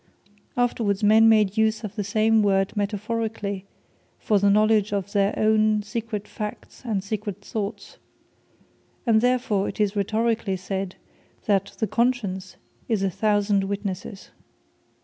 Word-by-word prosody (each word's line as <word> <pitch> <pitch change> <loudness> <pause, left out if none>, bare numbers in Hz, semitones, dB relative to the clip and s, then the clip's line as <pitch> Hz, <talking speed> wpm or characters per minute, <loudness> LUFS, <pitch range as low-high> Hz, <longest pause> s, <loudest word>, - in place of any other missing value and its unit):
Afterwards, 225 -4 0
men 220 +2 +6
made 210 -2 +3
use 220 0 +2
of 210 0 -6
the 210 - -2
same 215 +2 +3
word 195 -1 +1
metaphorically, 205 -1 -3 0.5
for 210 -4 +1
the 200 +1 +3
knowledge 215 0 +3
of 200 -1 -2
their 200 -1 +2
own 215 -1 +3
secret 215 -1 -4
facts, 210 -1 -7
and 215 -6 -2
secret 205 -1 -4
thoughts; 210 0 -5 1.1
and 220 -2 +4
therefore 245 -5 +1
it - - -9
is 210 -1 +1
Rhetorically 220 0 0
said 190 0 -4 0.5
that 200 -2 0
the 220 - 0
Conscience 215 -6 -1 0.3
is 215 -4 +1
a 195 - +1
thousand 205 0 +1
witnesses. 195 0 -5
210 Hz, 130 wpm, -24 LUFS, 200-220 Hz, 1.1 s, men